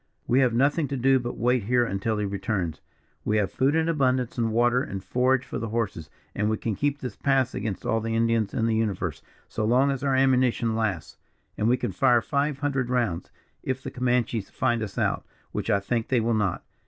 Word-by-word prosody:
"We 125 - +3
have 130 -3 +4
nothing 145 +4 +2
to 140 0 -3
do 135 +1 +4
but 120 0 -4
to - - -13
wait 125 -2 +1
here 120 +2 +3
until 105 +1 -1
he 105 - -1
returns. 100 -4 -2 0.4
We 110 - +1
have 105 -2 0
food 135 +3 +1
in 160 0 +2
abundance; 130 -6 +1
and 115 -2 0
water 120 +2 +3
and 95 -7 -5
forage 130 +6 +1
for - - -5
the 115 +1 -4
horses, 105 -9 -3 0.2
and 105 +1 0
we 110 - 0
can 110 - -2
keep 145 +3 0
this 125 -6 -6
pass 135 -2 +1
against 105 -4 -4
all 115 0 +1
the 115 0 -2
Indians 115 -2 +1
in 115 - 0
the 115 - +1
universe, 110 -3 -1 0.3
so - - -3
long 125 +5 +3
as 135 0 -4
our 135 -2 +2
ammunition 130 -3 +2
lasts 105 -8 -2 0.4
and 105 - 0
we 125 +2 +4
can - - -2
fire 120 -2 +3
five 140 +4 0
hundred 135 -4 0
rounds, 120 -9 -1 0.3
if 130 0 -3
the - - -5
Comanches 125 -4 0
find 120 -3 0
us 105 -3 -5
out, - - 0 0.3
which - - -3
I 100 - +3
think 115 +3 -2
they 125 - +2
will 115 +1 +1
not. 105 -4 0
120 Hz, 220 wpm, -26 LUFS, 110-130 Hz, 0.4 s, have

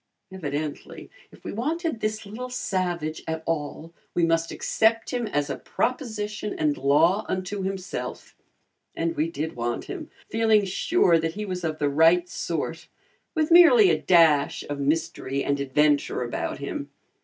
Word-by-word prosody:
Evidently, 150 -5 -5 0.2
if - - -18
we - - -5
wanted 315 - -2
this 215 0 -2
little 235 +5 -7
savage 175 -9 -2
at 160 0 -3
all 165 +1 -3 0.2
we 175 - +3
must 165 0 +1
accept 225 0 +1
him 245 -2 -1
as 145 -7 -1
a - - -4
proposition 215 -5 -3
and 150 -1 +1
law 160 +9 +3
unto 185 +2 -3
himself. 190 -1 -5 0.6
And 165 0 -1
we 155 +2 0
did 160 -1 -4
want 120 0 -2
him, 345 -6 -7 0.2
feeling 220 -2 +3
sure 190 - +2
that 165 0 -2
he 210 0 -4
was 185 -2 -4
of 155 -2 -2
the 145 - 0
right 165 +5 +4
sort, 165 -1 -4 0.5
with 315 0 +1
merely 365 +5 +8
a - - 0
dash 160 -5 +4
of 145 -1 -4
mystery 140 -2 -1
and 140 0 0
adventure 145 0 +1
about 120 - -3
him. - - -5
170 Hz, 155 wpm, -25 LUFS, 150-215 Hz, 0.6 s, merely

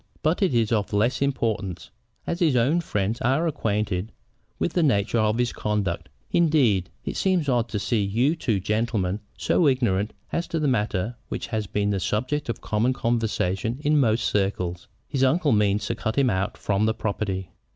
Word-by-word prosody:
But 155 +6 +1
it 185 -10 +2
is 115 -2 +2
of 105 -2 0
less 115 +7 +1
importance, 110 -9 -1 0.3
as 170 - -2
his 160 -7 +3
own 135 +9 +3
friends 105 - -2
are 135 +8 +2
acquainted 105 - -1 0.5
with 170 - -1
the 175 - +2
nature 115 -6 +2
of 110 +1 +2
his 120 -1 0
conduct. 100 -7 -2 0.2
Indeed, 130 - +3 0.2
it - - -3
seems 185 -6 +1
odd 120 -3 +1
to - - -2
see 110 +2 0
you 120 +10 +1
two 115 - 0
gentlemen 105 -1 -1 0.2
so 170 - +2
ignorant 115 -6 +1 0.2
as 170 - -1
to 165 - -2
the 150 - +1
matter 110 -2 0
which - - -3
has 110 -3 -3
been 105 +1 0
a 100 - 0
subject 130 - -1
of 115 - -3
common 110 +4 +1
conversation 115 -2 -1
in 150 0 +3
most 115 -3 +2
circles. 90 -3 -1 0.2
His 135 -2 0
uncle 145 +3 +3
means 105 -1 +2
to - - -1
cut 110 - -3
him 135 -3 +4
out 95 +1 -1
from 105 +1 +1
the 110 - +1
property." 100 -3 -3
115 Hz, 180 wpm, -25 LUFS, 100-135 Hz, 0.5 s, him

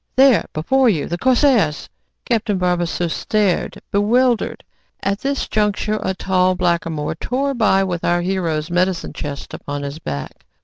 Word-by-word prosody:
"There, 265 -2 +5
before 255 +12 +2
you, 160 -9 0
the 175 +1 -4
corsairs" 250 - +3 0.4
Captain 225 -4 0
Barbassou 175 -1 0
stared, 200 +2 0
bewildered. 235 +4 +2 0.4
At 200 +1 0
this 275 0 -2
juncture 210 0 0
a 190 - -2
tall 185 -1 +1
blackamoor 170 -4 -1
tore 270 - -2
by 210 -5 +3
with 175 -3 -3
our 175 0 +2
hero's 175 -4 -1
medicine 180 0 0
chest 145 -2 -6
upon 145 0 -5
his 140 +2 -5
back. 70 - -6
185 Hz, 140 wpm, -19 LUFS, 170-220 Hz, 0.4 s, There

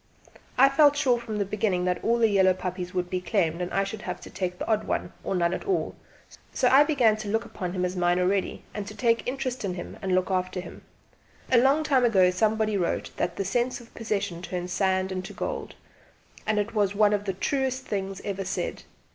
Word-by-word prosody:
I 270 +2 +8
felt 290 +1 +5
sure 255 -5 +3
from 225 -3 -5
the 200 - 0
beginning 195 -3 0
that 180 0 -1
all 235 +1 +3
the 230 -1 +4
yellow 190 -3 +4
puppies 180 -1 -4
would 180 -1 -1
be 180 0 -2
claimed 180 -4 0
and 180 - -2
that - - -3
I 195 - +3
should 195 +1 -6
have - - -5
to - - -11
take 180 -1 -3
the - - -4
odd 215 -1 +1
one, - - -2
or - - -2
none 170 -1 +1
at - - -4
all; 390 -3 0 0.6
so 255 - +2
I 275 +3 +7
began 250 -8 +3
to 215 -1 -6
look 220 +2 0
upon 180 -1 -5
him 180 -1 0
as 180 +1 -3
mine 175 0 +2
already, 190 +1 0
and 205 -1 -5
to 210 - -8
take 230 -2 +2
an - - -12
interest 255 -1 -3
in 185 -3 -2
him 175 - -8
and 190 -2 +1
look 185 +1 +1
after 185 0 -1
him. 180 - -9 0.7
A 245 - +7
long 275 +5 +4
time 275 -4 +3
ago 190 -6 +5
somebody 215 +2 +1
wrote 175 -3 -1
that 175 - -1
"the 195 - -2
sense 240 +6 0
of 235 -1 -16
possession 200 -6 -3
turns 180 0 -4
sand 190 -1 +1
into 185 0 -5
gold," - - -4 0.7
and 215 0 +1
it 210 +2 -1
is 205 -1 +1
one 210 0 +4
of 205 0 -1
the 195 - -1
truest 260 +5 -1
things 195 -1 -3
ever 195 -1 -3
said. 185 - -3
200 Hz, 230 wpm, -26 LUFS, 185-235 Hz, 0.7 s, I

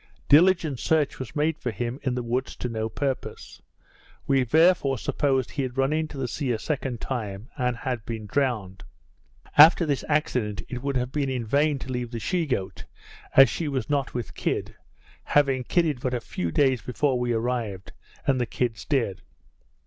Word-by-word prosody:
Diligent 160 -3 +4
search 155 -3 +1
was 130 +2 -7
made 155 +1 0
for 125 - -3
him 120 +4 -4
in 130 -2 -1
the 125 - -2
woods 125 +3 -2
to - - -4
no 110 -2 -3
purpose; 135 +3 -4 0.6
we 135 -2 +3
therefore 155 0 +3
supposed 135 0 0
he 145 - -2
had 130 -1 -4
run 135 +2 +2
into 155 -2 -2
the 130 -2 -2
sea 130 +2 -2
a 115 - 0
second 130 -1 -3
time, 110 -3 -5
and 125 -3 -1
had 125 -4 -3
been 110 -1 -5
drowned. 105 -6 -1 0.8
After 165 +3 +9
this 145 -3 -1
accident, 125 -8 0
it 125 -1 -5
would 140 -1 -1
have 125 +1 -2
been 140 -1 -1
in 125 -3 -2
vain 145 +5 +2
to 130 0 -7
leave 125 -1 -3
the 115 -1 -5
she 170 - -1
goat, 100 -9 -3 0.5
as 135 0 +10
she 165 - -3
was 135 -3 -2
not 140 -4 -1
with 110 -8 -4
kid; - - -2 0.5
having 135 -3 +2
kidded 160 -5 +1
but 125 0 -1
a - - -1
few 90 -6 -4
days 130 - +2
before 130 0 0
we 125 0 0
arrived, 115 -5 -2 0.3
and 130 -2 +2
the 120 - -1
kids 115 -4 -2
dead. 120 -10 0
130 Hz, 185 wpm, -25 LUFS, 120-145 Hz, 0.8 s, as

